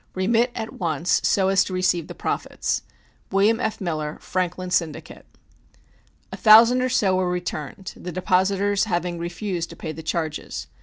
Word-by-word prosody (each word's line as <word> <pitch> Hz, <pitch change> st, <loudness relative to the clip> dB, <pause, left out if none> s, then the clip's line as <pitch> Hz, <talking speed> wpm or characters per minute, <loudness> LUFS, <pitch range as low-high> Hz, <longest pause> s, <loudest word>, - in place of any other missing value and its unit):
Remit 225 Hz, +6 st, +2 dB
at 220 Hz, -, -5 dB
once 165 Hz, -1 st, 0 dB
so 190 Hz, -1 st, +2 dB
as 195 Hz, 0 st, +4 dB
to 185 Hz, -, -6 dB
receive 185 Hz, -3 st, +1 dB
the -, -, -9 dB
profits. -, -, -2 dB, 0.5 s
WILLIAM 205 Hz, +4 st, +3 dB
F. 220 Hz, -3 st, -2 dB
MILLER, 155 Hz, -5 st, -3 dB
Franklin 185 Hz, 0 st, -3 dB
Syndicate. 160 Hz, -4 st, -2 dB, 1.0 s
A -, -, -6 dB
thousand 230 Hz, +3 st, +7 dB
or 255 Hz, -, +1 dB
so 200 Hz, -7 st, +2 dB
were 185 Hz, -1 st, +1 dB
returned, 180 Hz, +1 st, -5 dB
the 180 Hz, -, -7 dB
depositors 195 Hz, +3 st, +1 dB
having 175 Hz, -3 st, -2 dB
refused 175 Hz, 0 st, -3 dB
to -, -, -10 dB
pay 160 Hz, -, -6 dB
the 160 Hz, -, -8 dB
charges. 155 Hz, -, -3 dB
185 Hz, 155 wpm, -23 LUFS, 170-200 Hz, 1.0 s, thousand